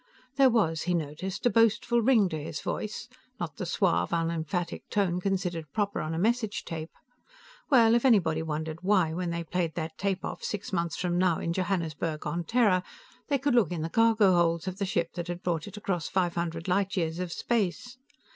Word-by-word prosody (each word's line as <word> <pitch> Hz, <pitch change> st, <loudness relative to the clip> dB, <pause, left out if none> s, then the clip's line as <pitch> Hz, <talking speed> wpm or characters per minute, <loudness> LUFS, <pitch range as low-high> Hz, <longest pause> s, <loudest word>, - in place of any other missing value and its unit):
There 270 Hz, -1 st, +6 dB
was, 180 Hz, -10 st, +1 dB
he 180 Hz, -, +3 dB
noticed, 170 Hz, +6 st, -4 dB
a 245 Hz, -, +4 dB
boastful 230 Hz, +1 st, +3 dB
ring 225 Hz, -4 st, +4 dB
to 155 Hz, -3 st, -4 dB
his 150 Hz, -1 st, -5 dB
voice 215 Hz, +2 st, -4 dB, 0.3 s
not 160 Hz, -4 st, -5 dB
the 185 Hz, -, -4 dB
suave, 180 Hz, +2 st, +1 dB
unemphatic 170 Hz, +1 st, -2 dB
tone 180 Hz, -3 st, 0 dB
considered 180 Hz, -5 st, -2 dB
proper 205 Hz, -1 st, -1 dB
on 155 Hz, +1 st, -3 dB
a -, -, -3 dB
message 220 Hz, +3 st, 0 dB
tape. 160 Hz, -1 st, -5 dB, 0.8 s
Well, 230 Hz, -5 st, +6 dB
if 235 Hz, -, +3 dB
anybody 180 Hz, -, +3 dB
wondered 160 Hz, 0 st, -4 dB
why, 185 Hz, -4 st, +2 dB
when 175 Hz, +1 st, -2 dB
they 170 Hz, 0 st, -2 dB
played 170 Hz, -1 st, -2 dB
that 160 Hz, -1 st, -5 dB
tape 195 Hz, -1 st, -1 dB
off -, -, -6 dB
six 205 Hz, -1 st, -4 dB
months 170 Hz, -2 st, 0 dB
from 175 Hz, -1 st, 0 dB
now 180 Hz, -3 st, +3 dB
in 165 Hz, -, -2 dB
Johannesburg 165 Hz, -4 st, -2 dB
on 165 Hz, +3 st, -2 dB
Terra, 215 Hz, -5 st, +3 dB, 0.5 s
they 285 Hz, -, +2 dB
could 275 Hz, 0 st, 0 dB
look 230 Hz, -9 st, +3 dB
in 165 Hz, -3 st, -2 dB
the 165 Hz, -, -2 dB
cargo 220 Hz, -1 st, +4 dB
holds 170 Hz, 0 st, +2 dB
of 185 Hz, +2 st, -4 dB
the 200 Hz, -, -1 dB
ship 170 Hz, -2 st, -1 dB
that 175 Hz, -1 st, -5 dB
had 175 Hz, 0 st, -5 dB
brought 165 Hz, -2 st, -1 dB
it 205 Hz, +1 st, -9 dB
across 180 Hz, -5 st, -2 dB
five 180 Hz, -2 st, +1 dB
hundred 170 Hz, 0 st, -3 dB
light 195 Hz, +2 st, +1 dB
years 165 Hz, -1 st, -1 dB
of 180 Hz, -2 st, -3 dB
space. 235 Hz, +5 st, -2 dB
180 Hz, 200 wpm, -28 LUFS, 165-205 Hz, 0.8 s, There